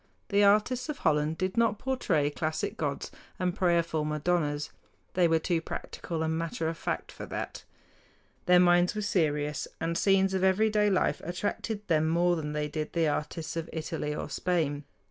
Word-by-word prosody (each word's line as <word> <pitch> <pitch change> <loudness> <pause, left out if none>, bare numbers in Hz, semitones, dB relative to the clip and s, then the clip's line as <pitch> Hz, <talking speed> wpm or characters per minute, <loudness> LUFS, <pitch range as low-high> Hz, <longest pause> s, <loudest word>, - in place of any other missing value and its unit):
The 205 0 +4
artists 215 +7 +3
of 300 - -3
Holland 155 0 +1
did 185 +3 -2
not 230 -3 +3
portray 200 - 0
classic 155 +1 -2
gods 145 -3 -3 0.3
and 180 -1 -1
prayerful 170 -5 +1
madonnas. 150 -1 0 0.4
They 180 -1 +4
were 165 0 +3
too 165 0 0
practical 165 0 -5
and 160 0 0
matter 165 0 -2
of 165 - -2
fact - - -3
for - - -8
that. - - -5 0.8
Their 180 0 +7
minds 175 +1 +4
were 210 - -2
serious, 150 -7 0
and 165 +1 -1
scenes 195 +1 +3
of 190 -1 0
everyday 210 +2 +3
life 190 - +1
attracted 205 +4 -3
them 160 -1 +2
more 175 +1 +3
than 150 -2 -4
they 150 0 -1
did 155 0 -4
the 165 -2 +2
artists 155 +2 -3
of 165 -1 -4
Italy 155 -2 -3
or - - -4
Spain. 155 -5 -1
170 Hz, 170 wpm, -29 LUFS, 155-190 Hz, 0.8 s, Their